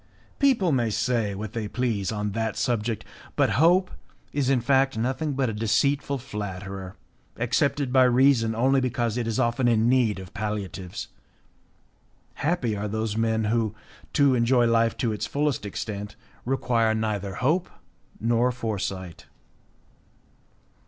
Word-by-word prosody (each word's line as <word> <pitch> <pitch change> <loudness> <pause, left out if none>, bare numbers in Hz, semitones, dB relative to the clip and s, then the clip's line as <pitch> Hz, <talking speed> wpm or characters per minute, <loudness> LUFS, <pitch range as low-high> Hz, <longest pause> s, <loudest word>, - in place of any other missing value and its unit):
People 245 - +3
may 120 -5 +1
say 110 -1 0
what 105 +1 -6
they 110 -2 -3
please 110 -4 -1
on 105 -1 -2
that 110 +1 -2
subject 115 -2 -1 0.3
but - - +2
hope 180 +3 +4 0.4
is 140 -2 0
in 135 -2 +3
fact 135 0 +2
nothing 130 +6 -1
but 135 -1 0
a 115 - -2
deceitful 140 +6 +1
flatterer 100 -6 -6 0.4
accepted 130 +2 0
by 130 - +6
reason 125 -3 +4
only 130 +3 +3
because 120 -3 -1
it 120 -2 -2
is 115 - -1
often 120 0 +1
in 115 -1 +3
need 120 -5 +3
of 95 -1 -10
palliatives. 100 -4 -4 1.2
Happy 145 -9 -1
are 105 +1 -3
those 110 0 -2
men 110 0 +1
who, 110 0 0 0.4
to 140 -2 +4
enjoy 120 0 +3
life 115 -1 +2
to 115 -3 0
the - - -5
fullest 145 -7 -1
extent, 105 +1 -5 0.3
require 115 -3 +1
neither 105 -3 -2
hope 160 - +1 0.5
nor 120 +2 +2
foresight. 95 -7 -4
115 Hz, 140 wpm, -25 LUFS, 105-130 Hz, 1.2 s, by